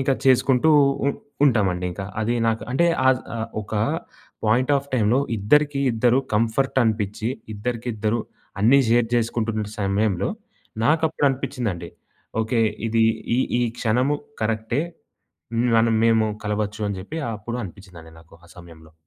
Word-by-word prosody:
ఇంకా 135 0 +2
చేసుకుంటూ 130 +2 +4 0.4
ఉ - - +4 0.4
ఉంటామండి 95 -9 +2
ఇంకా. 95 +2 -6 0.2
అది 115 +2 0
నాకు 115 0 0
అంటే, 170 +6 +3 0.2
ఆద్ 130 -1 +3 0.2
ఆహ్, 115 0 -3
ఒక 105 - -7 0.7
పాయింట్ 125 +6 +2
ఆఫ్ 140 0 -4
టైమ్‌లో 115 +2 +3 0.2
ఇద్దరికి 145 +7 +2
ఇద్దరు 120 +3 +3 0.2
కంఫర్టనిపించి, 110 -2 0 0.3
ఇద్దరికిద్దరు 115 0 -2 0.4
అన్నీ 130 +6 +6
షేర్ 115 0 +3
జేసుకుంటున్న 115 -2 0
సమయంలో 100 -1 0 0.5
నాకప్పుడు 160 0 +2
అనిపించిందండి 115 -10 -4 0.5
ఓకే, 115 +1 0 0.3
ఇది 115 0 +3 0.3
ఈ - - +1 0.2
ఈ - - +2 0.2
క్షణము 125 +6 +1 0.3
కరెక్టే, 110 +5 0 0.7
హ్మ్, 120 +2 +1
మనం 115 0 +3
మేము 115 -1 +4 0.2
కలవచ్చు 105 0 -2
అని 100 - -3
జెప్పి 150 +13 -6 0.2
అప్పుడు 120 +4 -5
అనిపించిందండి 90 -4 -12
నాకు 80 0 -20
ఆ - - -18
సమయంలో. 80 -2 -14
115 Hz, 130 wpm, -23 LUFS, 105-125 Hz, 0.7 s, అన్నీ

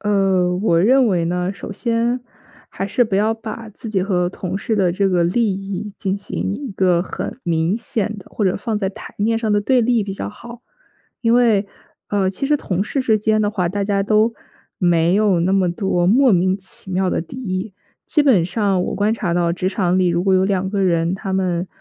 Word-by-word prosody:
呃， 195 -3 +2
我 170 -4 +2
认 255 +5 +4
为 175 -4 +1
呢， 180 +2 -1
首 200 - -8
先 235 +3 0 0.5
还 195 - -4
是 245 +5 +1
不 200 -3 -1
要 215 +3 +2
把 225 0 -7
自 215 +1 -9
己 190 -3 +1
和 180 -3 0
同 185 0 -5
事 220 +2 -2
的 180 -3 +2
这 195 +1 +1
个 175 -2 +2
利 210 +3 +1
益 195 +1 -5
进 195 -2 -1
行 200 -1 -3
一 275 -2 -6
个 180 -3 +2
很 195 - -6
明 170 +3 0
显 220 -3 -3
的， 190 - -13
或 210 - -2
者 185 - +1
放 220 0 -2
在 195 - -1
台 190 - -10
面 225 +2 +1
上 225 -2 -2
的 205 0 +3
对 250 +4 +2
立 235 -1 +2
比 195 - -5
较 - - -4
好。 235 +3 -11 0.6
因 230 0 +3
为， 225 -5 +3 0.4
呃， 195 -2 +1
其 270 +8 -2
实 295 +1 +3
同 195 -6 -2
事 275 - -2
之 220 -4 +2
间 215 +1 +1
的 205 - +1
话， 185 -5 -1
大 200 +2 -2
家 200 0 0
都 215 +2 +2 0.5
没 175 -1 +3
有 200 -5 +3
那 185 +3 +1
么 185 -3 +2
多 175 -2 0
莫 255 +5 +5
名 185 +1 +2
其 190 0 -7
妙 185 0 0
的 - - 0
敌 175 +10 -9
意， 200 -4 -4 0.3
基 300 - +3
本 240 - +4
上 195 0 0
我 - - -3
观 205 +3 +1
察 190 -7 -2
到 170 -1 +1
职 185 +1 -1
场 185 -2 0
里 185 - +3
如 170 0 +1
果 190 0 +3
有 185 - +3
两 190 -1 0
个 200 -1 -1
人， 170 -1 +1
他 195 0 -5
们 185 -2 0
195 Hz, 240 characters per minute, -19 LUFS, 185-220 Hz, 0.6 s, 莫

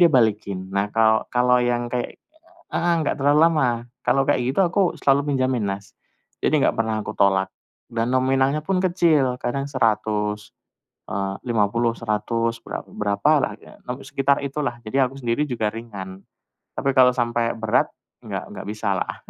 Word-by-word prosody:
dia 175 - +8
balikin. 100 -6 +1
Nah, 100 +1 0
kalau 110 0 +4
kalau 125 0 +4
yang 120 0 0
kayak 125 -1 -3 0.6
heeh, 175 0 +1
enggak 155 -1 -1
terlalu 145 +2 +4
lama. 150 -6 +2 0.4
Kalau 130 +2 +3
kayak 125 - +2
gitu 135 +9 +1
aku 185 0 +1
selalu 140 +1 +2
pinjemin, 130 -3 0
Mas, 100 +1 -5 0.5
jadi - - +3
enggak - - +2
pernah 110 -1 0
aku - - -5
tolak. 95 -1 +3 0.4
Dan 115 +1 -1
nominalnya 135 +3 +2
pun 190 -1 +1
kecil, 155 -8 +2
kadang 135 +3 -2
100, 105 -4 0 0.6
eee, 95 -1 -2
50, 115 +1 +1
100, 115 +1 -1
bera - - -4
berapalah, 105 +8 +1 0.5
sekitar 140 +1 +1
itulah, 135 -4 -3
jadi 130 +4 +2
aku 135 +1 -11
sendiri 120 +5 0
juga 115 -6 -1
ringan. 100 -4 -8 0.5
Tapi 135 - 0
kalau 125 -1 +7
sampai 120 -1 0
berat, 110 -1 +1 0.4
enggak - - -4
enggak - - -8
bisalah. 105 -3 -2
120 Hz, 150 wpm, -23 LUFS, 105-135 Hz, 0.6 s, dia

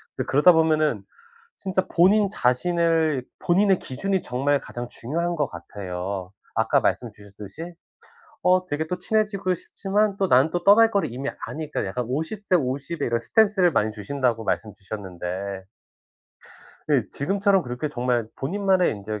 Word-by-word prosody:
근데 - - -3
그러다 150 +6 +6
보면은 155 - +2 0.5
진짜 190 -1 -1
본인 200 +4 +4
자신을 160 -2 +1
본인의 190 +2 +3
기준이 190 +8 -2
정말 140 +3 0
가장 120 0 -7
중요한 170 +9 -3
것 145 -4 0
같아요. 90 +1 -6 0.2
아까 - - +2
말씀 120 - 0
주셨듯이 105 - -10 0.7
어 185 +1 +3
되게 160 -1 -3
또 180 - -3
친해지고 200 -1 0
싶지만 200 +3 -1
또 195 - +1
나는 135 +1 +4
또 175 -1 -2
떠날 220 +4 +7
거를 200 - 0
이미 135 +3 -3 0.2
아니까 155 -6 -4
약간 120 +6 -3
50:50 155 - -2
의 - - +1
이런 115 0 0
스탠스를 195 - +3
많이 110 -4 +1
주신다고 115 +2 -1
말씀 110 -2 -2
주셨는데 95 -1 -6 1.3
예 - - +3
지금처럼 195 +4 +1
그렇게 125 +4 -4
정말 120 -4 -1
'본인만의 190 +4 +1
인제 105 0 -5
150 Hz, 315 characters per minute, -24 LUFS, 115-185 Hz, 1.3 s, 떠날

